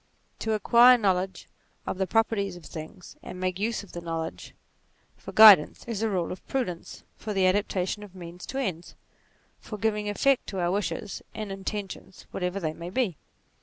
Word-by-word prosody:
To 220 - -1
acquire 240 +3 +6
knowledge 190 -3 -1 0.4
of 185 - -4
the 190 - +1
pro 225 +4 +4
perties 200 -5 -3
of 170 - -14
things, 160 +5 -10
and 180 0 -9
make 185 0 -2
use 220 +1 -1
of 200 - -14
the 175 - -6
knowledge 165 -1 -5 0.6
for - - -10
guidance, 210 -8 +8
is 230 -3 -4
a 225 - +1
rule 180 -4 -1
of 185 - -8
prudence, 180 -11 -4
for 215 - -5
the 190 -1 +3
adaptation 190 +1 0
of 200 -3 -12
means 175 0 -9
to 265 - -5
ends; 180 -10 -3 0.6
for 215 - -8
giving 210 0 -1
effect 270 +6 +2
to 190 - -4
our 175 0 +1
wishes 195 -1 -3
and 215 -2 -5
intentions 195 -1 -6
whatever 180 +1 -2
they 160 -4 -2
may 170 +2 -7
be. 200 -3 0
195 Hz, 180 wpm, -27 LUFS, 180-215 Hz, 0.6 s, guidance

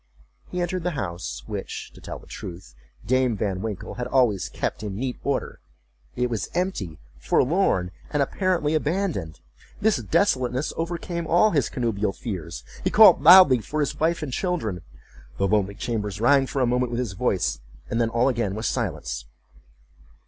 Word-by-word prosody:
He 180 - -4
entered 180 +1 -1
the 170 -3 -2
house, 85 -7 -4
which, - - -6
to - - -15
tell - - -7
the - - -16
truth, 85 -8 -9 0.3
Dame 130 -2 +2
Van 95 -2 -2
Winkle 105 -3 -5
had 120 - -2
always 120 -8 +2
kept - - -3
in 105 -3 -5
neat 125 +3 -3
order. 140 - -2 0.6
It 125 - +1
was 115 -5 -3
empty, 145 - -2 0.2
forlorn, 130 - +2 0.2
and 145 -1 +1
apparently 170 -1 0
abandoned. 155 - -1 0.4
This 215 -3 +3
desolateness 130 - +1
overcame 170 0 -3
all 175 +7 +4
his 145 -7 +1
connubial 110 -5 -1
fears—he 90 -9 -5
called - - +7
loudly 160 -5 +9
for 150 +8 -4
his 145 - -1
wife 165 +1 +1
and 135 -4 -5
children—the 90 - -4
lonely 100 -1 +1
chambers 105 -4 -3
rang 135 +3 +4
for 135 0 0
a - - +4
moment 125 +1 +1
with 120 - -2
his 120 -7 -2
voice, 90 - 0 0.3
and 115 - -1
then 115 - +2
all 120 +2 +2
again 115 -7 0
was 110 +2 -4
silence. - - -2
125 Hz, 160 wpm, -24 LUFS, 100-155 Hz, 0.6 s, loudly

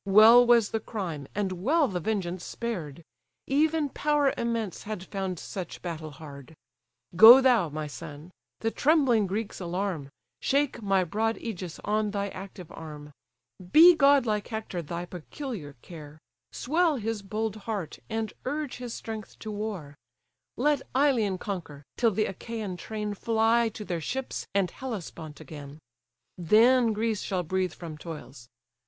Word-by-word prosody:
Well 220 +5 +8
was 235 -3 +5
the 225 - 0
crime, 175 - -5
and 200 -2 -1
well 275 - +2
the 185 -5 -3
vengeance 185 -3 -2
spared; 170 - -5 0.4
Even 305 +2 +2
power 290 0 +1
immense 230 -5 -2
had 215 -3 -5
found 190 -2 -4
such 180 +1 -7
battle 160 -3 -5
hard. 145 0 -11 0.6
Go 230 +7 +11
thou, 245 -10 +4
my 155 +1 -4
son! 150 +3 -9 0.3
the 225 - 0
trembling 265 -9 +3
Greeks 205 +3 -4
alarm, 180 -5 -3 0.3
Shake 280 -2 0
my 195 -2 +2
broad 220 +6 0
ægis 185 -7 -6
on 210 0 +1
thy 200 0 -2
active 185 -3 -9
arm, 150 -2 -9 0.6
Be 340 +3 +9
godlike 275 -9 +3
Hector 220 -6 -4
thy 170 +2 -5
peculiar 180 - -7
care, 155 -3 -11 0.3
Swell 320 +3 +1
his 225 -3 -3
bold 215 +2 -3
heart, 205 -5 -5
and 220 0 -2
urge 290 0 -3
his 245 -2 -6
strength 220 -2 -7
to 215 - -7
war: 205 -9 -5 0.6
Let 290 +2 +2
Ilion 245 -9 +2
conquer, 170 -8 -6
till 235 - +3
the 215 +1 0
Achaian 210 0 -5
train 210 +2 -4
Fly 225 +2 +2
to 210 0 -8
their 175 -3 -3
ships 265 - -4
and 190 -3 +2
Hellespont 180 - -7
again: 145 -2 -10 0.6
Then 230 +7 +5
Greece 220 -1 -1
shall 185 -3 -2
breathe 185 0 -1
from 160 -3 -8
toils." 150 -7 -9
210 Hz, 145 wpm, -28 LUFS, 175-235 Hz, 0.6 s, Go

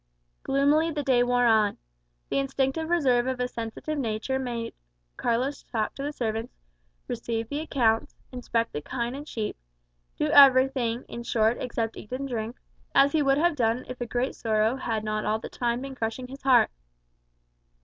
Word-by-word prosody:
Gloomily 285 +4 +2
the 300 -2 -3
day 255 -3 +3
wore 245 0 +3
on. 220 -3 +3 0.5
The - - +1
instinctive 275 +3 -1
reserve 260 -8 +3
of 260 -1 -2
a 250 - 0
sensitive 235 +6 -5
nature 230 +2 -1
made 235 -3 -4 0.4
Carlos 250 +5 -1
talk 220 -3 -2
to - - -8
the 290 +1 -2
servants, 225 -3 -3 0.5
receive 230 -1 -3
the 290 - -2
accounts, 235 -8 +1 0.2
inspect 235 -2 -2
the 150 - -3
kine 235 - -3
and 290 +2 -7
sheep 220 -6 -3 0.6
do - - 0
everything, 260 -3 +5
in 235 - -7
short, 225 0 +1
except 230 -2 -2
eat 210 - -11
and 270 +2 -3
drink 230 -1 -4 0.4
as 275 +1 +6
he 315 - +2
would 275 -1 +3
have 340 +1 +2
done 235 -1 0
if 250 0 -8
a 240 - -2
great 245 +3 -1
sorrow 220 +1 +1
had 225 -5 -2
not 215 0 -2
all 215 +1 +1
the 220 - -8
time 240 0 -1
been 275 0 -6
crushing 230 +1 -3
his 270 +2 -10
heart. 260 -2 +5
245 Hz, 175 wpm, -27 LUFS, 230-275 Hz, 0.6 s, as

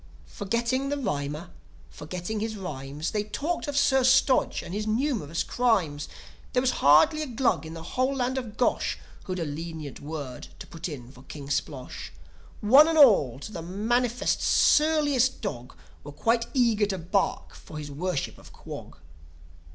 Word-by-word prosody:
Forgetting 235 +6 -1
the 285 - -1
rhymer, 150 - -3 0.4
forgetting 180 +7 -5
his 220 +1 -3
rhymes, 150 -5 -5
They 210 -1 -1
talked 300 +11 -3
of 285 -1 -2
Sir 265 -2 +4
Stodge 260 0 +3
and 175 - -8
his 210 +1 -3
numerous 220 - 0
crimes. 190 -12 0 0.4
There 250 - +3
was 260 - +3
hardly 305 - +6
a 305 - -3
C3lug 245 -7 0
in 160 +1 -8
the 165 - -8
whole 260 +8 -1
land 260 0 0
of 225 -3 -9
Gosh 250 - +1 0.3
Who'd 185 -1 -3
a 170 - -2
lenient 155 -1 -6
word 145 -4 -7
to - - -9
put 165 +1 -6
in 130 -5 -8
for 130 - -15
King 140 -1 -9
Splosh. 135 -4 -4 0.5
One 270 +9 +7
and 325 -1 +1
all, 200 - +6
to 215 - -7
the 170 - -6
mangiest, 230 +7 0
surliest 295 -4 +3
dog, 125 - -6 0.3
Were 145 - -8
quite 230 +9 +1
eager 230 -5 +3
to 195 -2 -2
bark 185 +3 -1
for 155 - -11
his 145 -1 -6
Worship 160 0 -3
of - - -15
Quog. - - -10
205 Hz, 165 wpm, -27 LUFS, 155-255 Hz, 0.5 s, One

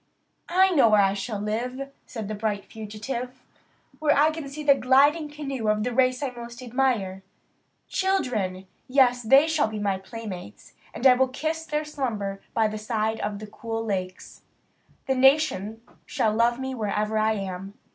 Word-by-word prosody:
"I 375 +2 +4
know 275 -9 +5
where 210 -1 +5
I 195 0 +2
shall 205 +1 -4
live," 250 +6 -3 0.2
said 220 -5 -6
the 215 - -4
bright 210 -1 -2
fugitive 235 +4 -6 0.6
"where 300 -2 +3
I 305 +2 +5
can 310 -3 -6
see 300 +2 -7
the 290 -1 +6
gliding 285 +4 +3
canoe 275 -6 -4
of 210 0 +2
the 245 - -2
race 255 +2 +2
I 270 - -1
most 235 0 -9
admire. 235 -7 0 0.7
Children! 225 - -1 0.2
yes, 255 -2 +4
they 270 +7 +5
shall 315 -4 +2
be 215 0 -5
my 200 -2 -1
playmates, 190 - -9 0.2
and 250 - -6
I 260 - +9
will 260 +1 +2
kiss 315 +5 -3
their 300 0 -1
slumber 215 -10 -3
by 220 -1 +3
the 215 0 -5
side 220 0 -1
of 205 0 -4
cool 225 0 -4
lakes. 185 -3 -4 0.6
The 265 - +1
nation 255 -6 +2 0.2
shall 215 - +1
love 235 +2 +2
me 265 0 -3
wherever 215 -1 -1
I 220 +1 +2
am." 195 -1 -5
235 Hz, 165 wpm, -25 LUFS, 210-270 Hz, 0.7 s, I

